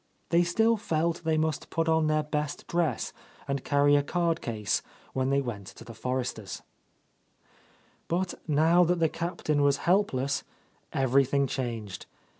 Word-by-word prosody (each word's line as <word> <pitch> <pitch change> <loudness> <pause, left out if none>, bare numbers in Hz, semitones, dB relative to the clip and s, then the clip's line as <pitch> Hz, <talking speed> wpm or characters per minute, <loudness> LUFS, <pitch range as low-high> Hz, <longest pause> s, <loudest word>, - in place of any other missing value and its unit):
They 170 0 +4
still 220 +6 +3
felt 170 -4 -1
they 160 -1 +1
must 155 -1 -1
put 165 0 -1
on 160 -1 +3
their 155 0 +2
best 150 -1 -3
dress 165 -8 -1 0.3
and 140 0 -2
carry 145 0 +4
a 145 - +4
card 170 +2 0
case 105 -4 -1 0.3
when 130 0 0
they 140 0 +2
went 105 -7 -5
to - - -11
the 115 - -10
Forresters'. 120 -3 -4 1.4
But 180 +2 -1
now 160 +4 +4
that 175 +1 +2
the 165 -1 +2
Captain 160 -3 -1
was 140 -1 +3
helpless, 140 -8 +2 0.5
every 135 +1 +3
thing 140 +1 +1
changed. 115 -8 -4
150 Hz, 150 wpm, -28 LUFS, 130-170 Hz, 1.4 s, They